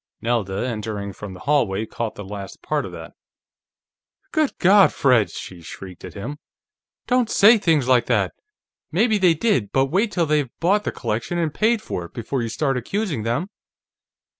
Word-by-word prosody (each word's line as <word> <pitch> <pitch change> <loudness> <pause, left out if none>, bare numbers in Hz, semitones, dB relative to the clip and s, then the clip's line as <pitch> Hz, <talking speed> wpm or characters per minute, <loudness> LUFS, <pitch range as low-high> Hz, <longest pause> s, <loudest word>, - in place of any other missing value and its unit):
Nelda, 115 -3 -1
entering 105 -3 -4
from 95 -1 -8
the - - -12
hallway, 110 -8 +1
caught 115 0 -4
the 105 - -7
last 100 0 -8
part 150 -1 -1
of - - -10
that. - - -9 1.2
"Good 310 -3 0
God, 195 +1 +6
Fred!" 120 -8 +3
she 90 +1 -9
shrieked 90 +2 -10
at - - -9
him. 130 +9 -6 0.7
"Don't 250 -2 +2
say 220 +3 +6
things 155 -9 +2
like 125 -2 +4
that! - - +1 0.6
Maybe 220 -2 +2
they 180 -3 +4
did, 150 - +1
but 135 0 +1
wait 205 +5 +2
till 175 -4 +1
they've 150 -4 +1
bought 200 +5 +2
the - - -1
collection 115 +11 -3
and 165 -3 -1
paid 220 0 +1
for 90 - -4
it, - - -15
before 120 +3 -2
you 115 - -2
start 135 +2 0
accusing 170 - -2
them!" 125 - -2
135 Hz, 175 wpm, -22 LUFS, -, 1.2 s, God